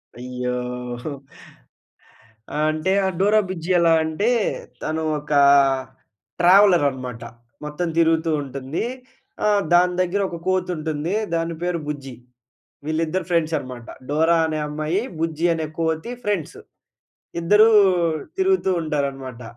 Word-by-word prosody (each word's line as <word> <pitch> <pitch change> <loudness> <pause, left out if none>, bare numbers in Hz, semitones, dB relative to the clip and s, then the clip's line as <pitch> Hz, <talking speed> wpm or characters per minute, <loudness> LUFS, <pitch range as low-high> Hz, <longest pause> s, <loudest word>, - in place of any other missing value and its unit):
అయ్యోహో! 125 +2 -5 1.4
ఆ! - - -2
అంటే 155 +4 -1
ఆ - - +2
డోరా 205 +3 +4
బుజ్జి 175 -2 -5
ఎలా 170 -1 +4
అంటే 160 +8 0 0.5
తను 160 +1 -2 0.2
ఒకా 145 0 +1 1.0
ట్రావెలర్ 180 -3 +6
అనమాట. 125 -3 -7 0.4
మొత్తం 150 +4 -3
తిరుగుతూ 165 0 +3
ఉంటుంది. 135 - -4 0.6
ఆహ్, 205 -1 +3
దాని 180 +1 +5
దగ్గర 185 +3 0
ఒక 170 - -6
కోతి 185 -1 0
ఉంటుంది. 155 +2 -3 0.2
దాని 165 0 -2
పేరు 175 -1 -1
బుజ్జి. 140 -3 -5 0.7
వీళ్ళిద్దరు 165 +3 -1
ఫ్రెండ్స్ 165 -2 +1
అనమాట. 125 -4 -8 0.2
డోరా 160 +3 +3
అనే 155 -1 -2
అమ్మాయి, 155 +5 -1 0.2
బుజ్జి 165 0 -1
అనే 160 -1 -2
కోతి 160 +7 -1
ఫ్రెండ్స్. 200 -7 -2 0.8
ఇద్దరూ 210 +6 +5 0.7
తిరుగుతూ 380 - +2
ఉంటారనమాట. 135 -5 -3
160 Hz, 115 wpm, -22 LUFS, 145-175 Hz, 1.4 s, ట్రావెలర్